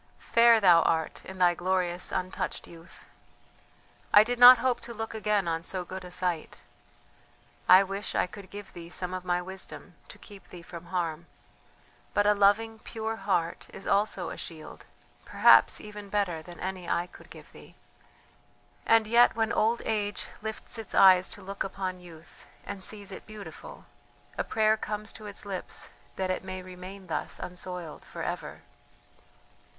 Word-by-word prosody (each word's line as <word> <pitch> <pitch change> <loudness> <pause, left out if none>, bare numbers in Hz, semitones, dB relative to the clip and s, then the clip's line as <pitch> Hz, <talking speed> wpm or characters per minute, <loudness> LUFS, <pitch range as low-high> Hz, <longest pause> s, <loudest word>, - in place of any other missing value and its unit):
"Fair 235 -1 +5
thou 175 -5 +6
art 160 0 -1
in 190 - -9
thy 180 -1 +4
glorious 180 0 0
untouched 185 +1 -3
youth. 165 0 -15 1.1
I 205 - +9
did 245 +2 -3
not 245 +1 +11
hope 255 -1 0
to 235 - -8
look 225 +1 -5
again 210 -3 0
on 165 0 -1
so 180 +1 -4
good 190 +1 -7
a 180 - -9
sight. 180 -3 -3 1.1
I 185 +2 +9
wish 195 +1 -5
I - - +3
could 190 +1 -12
give 205 0 -10
thee 170 -1 -9
some 180 +1 -4
of 185 -1 -4
my 180 0 0
wisdom 190 +1 -7
to - - -12
keep 200 -3 -14
thee 175 -1 -11
from 170 -1 -10
harm, 170 -2 -3 0.9
but 205 - +3
a 210 - +5
loving, 210 +2 +2
pure 225 0 -4
heart 170 -6 -1
is 195 - -10
also 200 -3 0
a - - -7
shield, 160 -2 -9 0.4
perhaps - - +5
even 210 -1 -9
better 195 -6 -1
than 175 +2 -12
any 185 -1 -5
I 170 - +1
could - - -16
give - - -13
thee; - - -15 1.1
and 225 -1 +5
yet 235 +2 +5
when 225 0 0
old 230 +2 +1
age 205 -2 -1 0.2
lifts 220 +2 -5
its 220 - -6
eyes 185 -1 +7
to 205 - -7
look 195 +1 -4
upon 190 -1 -4
youth, 170 -2 -15 0.2
and 200 -2 -7
sees 205 -1 -4
it - - -9
beautiful, 215 -2 -10 0.5
a - - -1
prayer 220 0 +2
comes 215 0 -5
to 215 - -10
its 205 0 -5
lips 195 -2 -6 0.2
that 185 -1 -1
it 185 - -3
may 185 -1 -6
remain 185 +1 -10
thus 165 - -3
unsoiled 180 -2 -7
for - - -8
ever! - - -5
190 Hz, 165 wpm, -28 LUFS, 180-210 Hz, 1.1 s, not